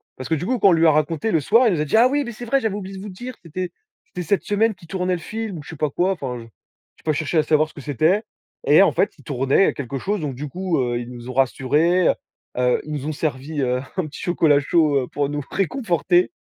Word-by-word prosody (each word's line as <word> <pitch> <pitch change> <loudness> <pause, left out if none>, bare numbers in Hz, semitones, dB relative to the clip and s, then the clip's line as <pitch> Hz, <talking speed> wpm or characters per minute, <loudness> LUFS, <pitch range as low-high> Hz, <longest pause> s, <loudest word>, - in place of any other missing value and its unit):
Parce 130 - -7
que - - 0
du 160 - -4
coup, 255 +1 +1
quand 200 - +5
on - - +5
lui 165 -1 +4
a - - +7
raconté 155 +7 0
le 165 - +3
soir, 230 - +4
il 200 - +2
nous 150 - -2
a - - 0
dit: 145 - 0
«Ah 240 - +7
oui, 285 +2 0
mais 235 - -5
c'est 240 +2 -8
vrai, 275 +4 +2
j'avais 220 -5 -1
oublié 195 -1 -6
de - - -8
vous 210 - -6
dire, 245 +7 -8
c'était 180 +2 -4 0.4
c'était 180 - -6
cette 195 +4 +1
semaine 215 +2 +1
qu'il 180 -4 -17
tournait 185 0 -1
le 175 - -2
film», 220 -4 -5
ou - - -9
je - - -13
sais - - -7
pas 150 -1 -1
quoi, 180 +6 +1
enfin, 130 -8 -5
j 115 - -11 0.5
j'ai - - -24
pas 155 - +1
cherché 155 +2 -1
à 155 - +5
savoir 155 0 +2
ce - - -21
que 145 - -8
c'était. 155 - +1 0.4
Et - - +6
en - - +5
fait, - - +1
il - - -16
tournait 135 +6 +2
quelque 135 -1 -4
chose, 205 +9 -1
donc 145 -4 -3
du 145 +4 -6
coup, 180 0 -1
heu, 120 -1 0
ils 120 0 -7
nous 120 0 -9
ont - - -5
rassurés, 145 - +2
heu, - - +4 0.4
heu, 125 0 +2
ils 155 - -8
nous 145 -2 -4
ont - - -1
servi, 150 0 -3
heu, 125 -1 0 0.2
un 180 - 0
petit 150 - -10
chocolat 160 -5 +3
chaud, 150 0 +2
heu, - - -6
pour 145 -1 -2
nous 145 0 -3
réconforter. 180 - +1
160 Hz, 285 wpm, -22 LUFS, 140-190 Hz, 0.5 s, a